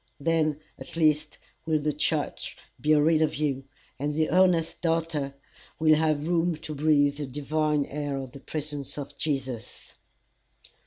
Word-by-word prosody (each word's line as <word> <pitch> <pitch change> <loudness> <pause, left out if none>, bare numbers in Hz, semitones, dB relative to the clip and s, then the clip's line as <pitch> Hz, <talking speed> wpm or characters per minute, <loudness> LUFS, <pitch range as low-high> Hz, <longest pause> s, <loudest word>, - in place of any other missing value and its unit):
Then 155 -1 +1 0.2
at - - -8
least 155 -2 +2 0.3
will 155 -1 +2
the 150 0 0
church - - -1 0.2
be 155 +1 +4
rid 155 +1 +4
of 155 - +2
you, 135 -3 -1 0.3
and 145 +1 -1
the 155 0 +1
honest 180 -2 +3
doubter 165 -5 0 0.4
will 155 -1 +5
have 155 -1 +2
room 170 0 +2
to 155 0 -7
breathe 145 -1 +3
the 145 -2 -3
divine 150 +2 0
air 145 -1 -3
of 135 -2 -6
the 140 - -10
presence 145 -1 -4
of 145 0 -6
Jesus. 135 -6 -3
150 Hz, 150 wpm, -27 LUFS, 145-160 Hz, 0.4 s, will